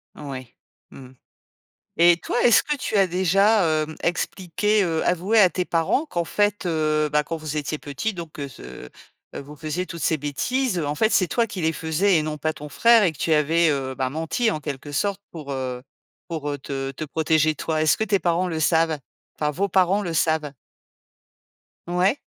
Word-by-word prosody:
Oui, 130 -5 -8 0.4
mmh. 130 -1 -12 0.9
Et 170 0 +6
toi, 245 - -2
est-ce 235 - +6
que 295 - -2
tu 255 - -3
as 195 -1 +5
déjà 195 +4 +3 0.2
hem 155 +1 -6
expliqué, 190 +4 0
heu 165 -2 -1
avoué 185 +6 +2
à 185 -3 +6
tes 180 - -2
parents 170 - 0
qu'en 175 - -2
fait 205 +1 0
heu, 155 -2 +1
bah 150 0 +2
quand 165 - -4
vous 155 -1 -5
étiez 150 +1 -2
petits, 145 +11 -4
donc 170 -3 -8
que 140 -2 -6
ce 90 - -11 0.5
heu - - -5
vous 145 +2 -11
faisiez 160 +4 -3
toutes 170 -2 -7
ces 160 - +2
bêtises. 185 - -1
En 145 -1 -2
fait, 220 +8 +2
c'est 185 - +3
toi 235 +6 +1
qui 190 - -6
les 160 0 +1
faisais 165 +5 +1
et - - 0
non 155 0 -3
pas 155 +2 -1
ton 150 -1 -9
frère 230 +8 +5
et 170 - +2
que 145 - -18
tu 160 - 0
avais 160 +2 +3
heu, 135 -2 -2
ben 130 0 -1
menti, 165 - 0
en 155 - -4
quelques 145 0 -6
sortes, 200 +5 -1
pour, 150 -4 -7
heu, 130 -2 -4 0.5
pour, 155 -4 -4
heu, 145 - -4
te 135 0 -4
te 155 - -6
protéger 155 0 +1
toi? 155 +2 -2
Est-ce 155 - +3
que 220 - 0
tes 200 -2 +1
parents 175 +1 +1
le 160 - -3
savent? 160 0 +2 0.4
Enfin, 150 -1 0
vos 200 +6 -1
parents 190 +2 +2
le 170 -4 -4
savent? 155 -3 0 1.3
Ouais. 180 +9 +2
160 Hz, 200 wpm, -23 LUFS, 150-185 Hz, 1.3 s, Et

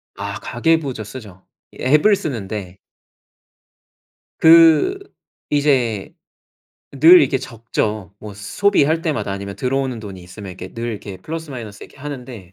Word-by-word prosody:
아 100 +1 -5
가계부 145 +2 0
저 110 - -6
쓰죠. 105 -4 -11 0.3
이 - - -17
앱을 150 +11 +4
쓰는데 105 - -5 1.6
그 165 - +6 0.5
이제 130 -8 +1 0.8
늘 165 +6 +8
이렇게 135 -2 +2
적죠. 110 -5 -4
뭐 105 -2 -9
소비할 155 - +1
때마다 115 - -2
아니면 100 0 -6
들어오는 130 0 -1
돈이 100 -4 -9
있으면 95 +3 -10
이렇게 90 +1 -9
늘 115 - -5
이렇게 100 -3 -7
플러스 160 -1 -7
마이너스 110 -6 -8
이렇게 - - -18
하는데. 125 -9 -8
120 Hz, 290 characters per minute, -20 LUFS, 100-150 Hz, 1.6 s, 늘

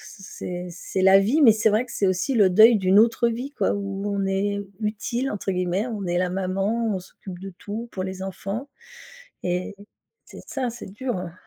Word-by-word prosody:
c 195 +1 -13
c'est 180 -1 -6
c'est 180 +2 -4
la 190 +1 +7
vie, 235 +11 +2
mais 235 -5 +9
c'est 220 +1 +2
vrai 215 +4 +2
que - - -14
c'est 200 - 0
aussi 185 +9 0
le 205 -5 +5
deuil 220 +5 +7
d'une 190 0 +4
autre 235 +2 +4
vie 250 +5 -5
quoi, - - 0
où 200 -1 -4
on 195 -1 0
est 200 +1 0 0.2
«utile» 230 +5 -2
entre 200 -1 -3
guillemets. 180 +4 -1
On 210 -5 -4
est 175 0 0
la 180 - +1
maman, 195 +4 -1
on - - -4
s'occupe 180 0 -11
de 195 0 -7
tout 220 +3 -6
pour 185 - -3
les 190 0 -5
enfants 195 +7 -5 0.8
et 180 +2 -2 0.5
c'est - - -12
ça, 260 -3 -2
c'est 235 -4 -9
dur, 245 +2 -3
hein. 180 -2 -6
200 Hz, 210 wpm, -24 LUFS, 185-225 Hz, 0.8 s, mais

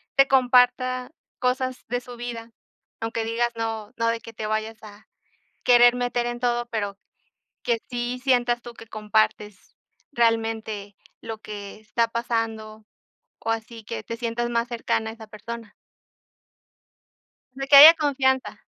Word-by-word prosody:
te 275 0 +6
comparta 255 0 +3 0.3
cosas 255 0 -1
de 245 +1 -1
su 245 0 -11
vida, 235 -1 -7 0.5
aunque 225 0 -2
digas, 235 +1 0
no 225 -2 -4
no 230 -1 0
de 230 0 0
que 230 - -11
te 215 -1 -5
vayas 215 0 -3
a 210 0 -14 0.6
querer 245 0 +6
meter 245 -1 -1
en 240 0 -4
todo, 240 -1 0
pero 205 -4 -3 0.7
que 235 -2 +1
sí 245 0 -3
sientas 245 -2 +2
tú 240 - -10
que 225 - -13
compartes 215 -2 -1 0.4
realmente 225 -4 -1 0.3
lo 225 -1 -7
que 205 -1 -9
está 220 +2 0
pasando, 225 -2 -3 0.5
o 225 - -3
así 225 0 -4
que 110 - -6
te 230 - -6
sientas 240 0 -2
más 235 0 0
cercana 230 -2 -2
a - - -7
esa 220 -1 -13
persona. 225 +1 -8 1.8
De 270 +1 -5
que 280 - +7
haya 300 +4 +13
confianza. 265 -4 0
230 Hz, 145 wpm, -24 LUFS, 220-245 Hz, 1.8 s, haya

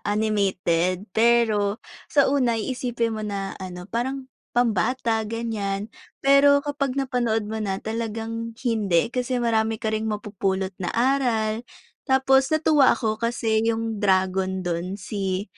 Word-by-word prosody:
animated 195 -4 0
pero 220 -3 +3 0.3
sa 285 -2 +4
una 255 -4 +2
iisipin 235 0 -2
mo 215 - -4
na, 200 -2 -3
ano, 180 -1 -7
parang 260 +5 -4 0.2
pambata 230 0 +1
ganyan, 220 -2 -3 0.3
pero, 280 +1 +5
kapag 280 -2 -2
napanood 240 -5 0
mo 220 +1 -4
na 195 -2 -1
talagang 225 +1 -4
hindi, 215 -4 +1
kasi, 250 0 -1
marami 225 -2 +1
ka 220 0 -3
ring 220 0 -1
mapupulot 195 -2 -2
na 175 - -2
aral. 235 -3 +1 0.5
Tapos, 265 0 +4
natuwa 310 -3 +4
ako 220 -2 -2
kasi, 230 -2 0
yung 225 -2 -2
dragon 190 -1 +1
dun 175 +2 -2
si 195 -1 -3
220 Hz, 125 wpm, -24 LUFS, 200-245 Hz, 0.5 s, pero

